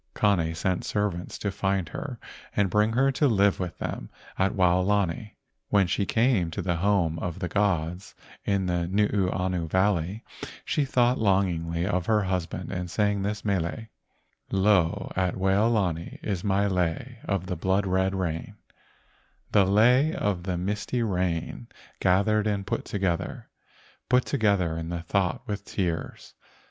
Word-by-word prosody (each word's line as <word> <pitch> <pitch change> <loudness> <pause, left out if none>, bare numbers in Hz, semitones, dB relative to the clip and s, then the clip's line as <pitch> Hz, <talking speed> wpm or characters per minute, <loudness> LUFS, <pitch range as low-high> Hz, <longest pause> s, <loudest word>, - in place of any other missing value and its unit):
Kane 85 -6 +2
sent 90 +3 -1
servants 100 -4 -2
to 100 - -2
find 95 -3 -1
her 130 -6 -6 0.4
and 100 -3 +2
bring 105 +3 +3
her 135 +3 +3
to 145 +2 +2
live 100 -4 +3
with 90 -2 -4
them - - -5 0.3
at 95 +1 +1
Waolani. 95 +1 +1 0.3
When 100 -2 +4
she 95 +3 -1
came 110 -7 +2
to 80 - -4
the 85 -2 0
home 85 -3 +1
of 85 -2 -4
the 90 - -3
gods 90 -1 -1 0.3
in 100 -2 0
Nuuanu 90 -1 0
Valley 95 +2 +1 0.4
she 145 - +1
thought 125 -1 +2
longingly 90 -5 +1
of 90 -3 -1
her 110 -2 +3
husband 90 -1 -3
and 90 -2 -3
sang 105 +1 +1
this 105 +2 -3
mele: 95 +2 -1 0.4
" - - -46
Lo, 95 -3 +2
at 90 -1 0
Waolani 95 -3 +1
is 95 -4 -2
my 100 0 +2
lei 95 +6 -1
of 100 -3 -1
the 90 - -3
blood 95 +4 +1
red 95 +1 +1
rain, 85 -4 -3 1.0
The 100 - +5
lei 125 - +4
of 100 - -1
the 90 0 -2
misty 105 +6 -2
rain 90 -5 -2 0.3
gathered 105 +3 +2
and 100 -2 -1
put - - -2
together, 95 -4 -2 0.6
Put 125 0 +4
together 100 - +1
in 80 0 -5
my 85 -1 -3
thought 90 +1 -1
with 105 -1 -3
tears. 85 -6 -4
95 Hz, 150 wpm, -26 LUFS, 90-105 Hz, 1.0 s, The